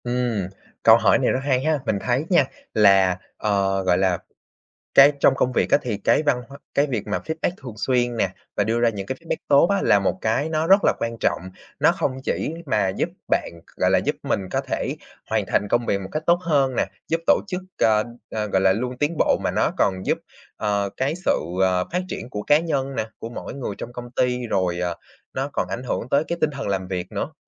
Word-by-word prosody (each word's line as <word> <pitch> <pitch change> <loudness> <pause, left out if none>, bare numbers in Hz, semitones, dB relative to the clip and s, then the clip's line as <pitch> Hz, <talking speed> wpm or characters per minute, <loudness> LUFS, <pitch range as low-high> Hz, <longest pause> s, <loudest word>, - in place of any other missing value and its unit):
Ừm, 120 -6 -1 0.4
câu - - +8
hỏi - - +4
này - - +2
rất 130 - 0
hay 130 -2 +1
ha, 155 -1 +1
mình 105 - +1
thấy 125 +4 0
nha, 170 -7 +5 0.3
là, 95 -3 +5 0.2
ờ, 100 -2 +1
gọi 90 -1 +3
là, 95 -2 +2 0.8
cái 140 +2 +8
trong 135 - +5
công 125 -1 0
việc - - +1
á, - - +6
thì 115 -4 -2
cái 105 - +2
văn 140 -5 +1
hóa 140 0 -11 0.2
cái 140 - +3
việc 120 -7 -3
mà 90 - -1
feedback 160 +1 -1
thường 125 -5 -7
xuyên 120 +2 0
nè, 110 - +1 0.3
và 105 - +2
đưa 115 +3 0
ra 120 - +4
những 100 -4 -4
cái 130 - -3
feedback 165 -1 -3
tốt 140 +3 +6
á, 200 -1 +2
là 105 - +5
một 95 -2 -1
cái 115 +8 0
nó 160 0 0
rất 195 +3 +6
là - - +5
quan 115 0 -3
trọng. - - +1 0.4
Nó - - +5
hông - - 0
chỉ 155 - -2
mà 105 -7 +1
giúp 95 - -1 0.2
bạn - - 0 0.2
gọi - - +2
là, - - +4
giúp - - -1
mình - - 0
có - - 0
thể - - -3 0.3
hoàn - - +1
thành 105 - 0
công 120 +2 +1
việc 100 - +1
một 95 - -7
cách 155 - -2
tốt 170 0 +4
hơn 140 -6 +2
nè, - - +2 0.2
giúp 165 +1 0
tổ - - +5
chức, 180 -2 -3 0.2
ờ, 110 -1 +4 0.3
ờ, 105 -1 -2
gọi 95 -2 +1
là, 95 0 +5
luôn 125 +5 -3
tiến 150 +4 0
bộ, - - +3
mà - - +2
nó - - +1
còn 95 -1 +1
giúp, - - +1 0.4
ờ, 100 -2 0
cái 135 +4 0
sự, - - +4 0.3
ờ, 90 -1 +2
phát 180 +1 0
triển 125 - -6
của 105 -4 -4
cá 145 - +4
nhân 140 -5 -2
nè, - - 0
của 115 - -6
mỗi 120 - -7
người 130 -7 -4
trong 120 - -7
công 120 0 -8
ty. 125 0 0
Rồi, 90 -5 0
ờ, 90 -1 -2 0.4
nó 135 +2 -2
còn - - -1
ảnh 125 - -4
hưởng 125 -1 -3
tới 140 +4 +2
cái 170 - -2
tinh 155 - +2
thần 140 -7 -5
làm 95 -2 -2
việc 90 -1 -4
nữa. - - -3
120 Hz, 240 wpm, -23 LUFS, 100-140 Hz, 0.8 s, câu